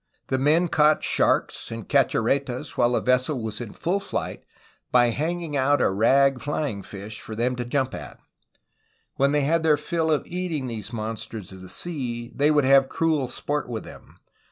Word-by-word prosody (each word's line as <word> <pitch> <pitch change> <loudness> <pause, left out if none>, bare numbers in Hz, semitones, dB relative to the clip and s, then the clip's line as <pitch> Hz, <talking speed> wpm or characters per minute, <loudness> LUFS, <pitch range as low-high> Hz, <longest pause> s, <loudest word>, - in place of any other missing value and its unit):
The 130 - +1
men 155 +6 +3
caught 155 -1 +3
sharks - - +1
and 115 0 -6
cachorretas 135 -1 +1
while 120 0 +3
the - - +1
ves 125 0 +3
sel 150 -5 -2
was 110 0 -5
in 115 -4 -6
full 185 +4 -1
flight 195 - -4 0.5
by 120 -1 +5
hanging 160 +4 -2
out 140 +1 +3
a - - +3
rag 135 +6 +3
flying 145 -7 -2
fish 105 +2 -8
for 110 - -7
them 125 +3 0
to 120 - -3
jump 130 +1 -1
at. - - -8 1.0
When 140 +1 +3
they 145 0 +2
had 160 +4 +2
their 155 -2 +4
fill 165 -1 -1
of 150 -2 +1
eating 175 -6 -3
these 115 -2 -5
mon 110 -1 -3
sters 110 -3 -7
of 95 -1 -11
the 95 - -11
sea, 120 - -5
they 145 +1 +2
would 150 -3 +3
have 135 0 +5
cruel 155 -5 +1
sport 145 +2 -3
with 115 -2 -4
them. - - -13
135 Hz, 190 wpm, -25 LUFS, 115-150 Hz, 1.0 s, by